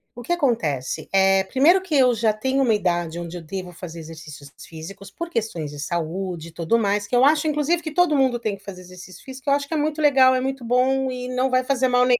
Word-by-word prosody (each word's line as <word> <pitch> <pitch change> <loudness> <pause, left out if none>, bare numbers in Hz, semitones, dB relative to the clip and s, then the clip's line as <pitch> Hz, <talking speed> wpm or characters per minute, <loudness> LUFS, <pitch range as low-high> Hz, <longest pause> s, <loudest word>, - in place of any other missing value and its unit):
O 240 - -8
que 345 - -1
acontece. 225 - -1
Eh, 195 0 +4
primeiro 290 - +4
que 365 -5 -3
eu 255 -3 +5
já 220 -1 +1
tenho 265 +5 -1
uma 235 -4 +3
idade 175 -4 -1
onde 170 0 -6
eu - - -8
devo 180 +3 -7
fazer 170 -1 -9
exercícios 155 -3 -11
físicos 180 +5 -10
por 335 +10 -7
questões 210 - -3
de 145 - -10
saúde 170 +2 -4
e - - -16
tudo 170 +7 0
mais, 205 -2 0
que 245 - -1
eu 245 - +4
acho, 300 +2 +4
inclusive 305 +3 0
que 315 - -5
todo 345 -3 +3
mundo 260 -3 +2
tem 215 -4 -3
que 195 - -24
fazer 190 -3 -9
exercício 180 0 -13
físico, 265 +1 -7
eu - - +4
acho 280 0 0
que 325 - -6
é - - 0
muito 305 +1 -1
legal, 265 -3 +5
é 255 - 0
muito 265 -1 -4
bom 260 +2 +1
e 250 0 -5
não 255 +1 0
vai 255 0 +2
fazer 260 0 +1
mal, 250 0 +3
230 Hz, 245 wpm, -22 LUFS, 180-270 Hz, -, eu